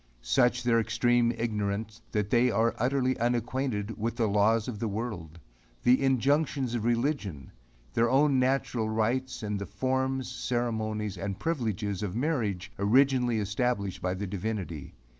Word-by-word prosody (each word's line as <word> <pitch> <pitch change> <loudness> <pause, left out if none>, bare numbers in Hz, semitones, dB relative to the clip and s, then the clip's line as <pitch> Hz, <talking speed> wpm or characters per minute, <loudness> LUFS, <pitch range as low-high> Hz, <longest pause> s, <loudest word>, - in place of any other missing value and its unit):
Such 120 - +3
is 125 - -5
their 120 -1 +3
extreme 115 +2 +2
ignorance 105 0 -2
that 105 -2 -1
they 125 +1 +4
are 115 +1 +2
utterly 130 +1 +1
unacquainted 120 -2 -1
with 115 +2 -1
the 115 - +1
laws 105 +2 +2
of 115 -5 -5
the 115 - -1
world 100 -7 -5 0.5
the 125 +2 +5
injunctions 135 0 +1
of 115 -2 -2
religion 115 - -1 0.4
their 115 +1 +3
own 135 +1 +4
natural 125 -3 0
rights, 120 +4 -1
and 105 -1 -2
the 100 - -5
forms, 130 0 -1
ceremonies 110 -5 -2
and 95 0 -3
privileges 110 - -2
of 100 -2 -3
marriage 115 - -1
originally 125 +2 +3
established 105 -2 -1
by 90 0 -1
the 100 +2 -4
Divinity. 95 -5 -4
115 Hz, 145 wpm, -29 LUFS, 105-125 Hz, 0.5 s, the